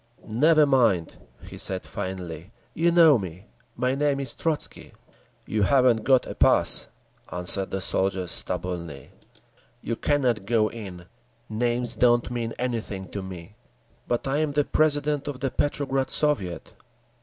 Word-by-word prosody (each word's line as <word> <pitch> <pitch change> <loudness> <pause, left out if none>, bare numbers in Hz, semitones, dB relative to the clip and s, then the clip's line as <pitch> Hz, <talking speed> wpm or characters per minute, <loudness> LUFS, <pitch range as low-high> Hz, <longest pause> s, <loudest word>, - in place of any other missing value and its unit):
"Never 150 +7 +4
mind," 115 - +2 0.3
he - - -10
said 95 -1 -1
finally. 90 -2 -6 0.2
"You 170 +1 +2
know 165 -6 +6
me. 95 0 -8 0.3
My 125 +2 0
name 140 0 0
is 135 -3 -1
Trotzky." 160 -3 -4 0.5
"You 110 - -2
haven't 125 -1 +3
got 130 -2 +4
a - - -6
pass," - - +5 0.4
answered 90 +2 -1
the 95 - -3
soldier 95 0 0
stubbornly. 85 -4 -4 0.7
"You 115 - -3
cannot 125 -8 0
go 110 -2 +2
in. 95 -6 -9 0.4
Names 120 +2 -1
don't 120 -1 +2
mean 115 -2 -3
anything 115 -6 -4
to 100 - -5
me." 90 -1 -9 0.5
"But 120 +2 -1
I 135 +2 0
am 155 -1 -1
the 145 0 +1
president 150 -2 +1
of 140 -3 -5
the 135 0 -2
Petrograd 135 -1 -1
Soviet." 100 - 0
120 Hz, 140 wpm, -25 LUFS, 95-140 Hz, 0.7 s, know